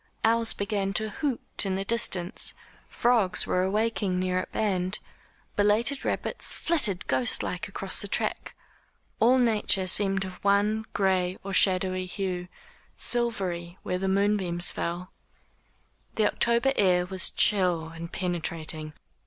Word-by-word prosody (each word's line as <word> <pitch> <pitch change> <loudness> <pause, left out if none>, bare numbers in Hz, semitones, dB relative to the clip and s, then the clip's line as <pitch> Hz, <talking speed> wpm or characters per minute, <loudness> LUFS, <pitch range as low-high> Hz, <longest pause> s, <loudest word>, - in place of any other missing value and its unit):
Owls 230 0 +3
began 200 -1 -2
to 215 +1 -1
hoot 270 -1 -2
in 195 -2 -1
the 195 +1 -3
distance, 195 -4 -1 0.3
frogs 235 -6 +3
were 180 - 0
awaking 205 -1 0
near 185 0 0
at - - -5
hand, 190 -2 0 0.6
belated 220 +7 +1
rabbits - - -1
flitted 235 - +1
ghost 130 -2 +2
like 180 - -4
across 195 -1 -1
the 205 - -4
track. - - -2 0.6
All 245 +3 +5
nature 215 -5 +2
seemed 195 +1 +1
of 185 -1 -10
one 205 +2 +2
gray 185 -2 +1
or 195 0 -5
shadowy 185 -1 +2
hue 180 -1 -3 0.5
silvery 190 -8 0
where 180 - -2
the 190 - -2
moonbeams 190 -3 +1
fell. 175 +2 -4 1.0
The 215 - +2
October 235 +5 +2
air 180 -3 +3
was 190 0 +1
chill 180 -5 +2
and 165 +1 -9
penetrating. 160 -3 -4
195 Hz, 130 wpm, -27 LUFS, 180-215 Hz, 1.0 s, All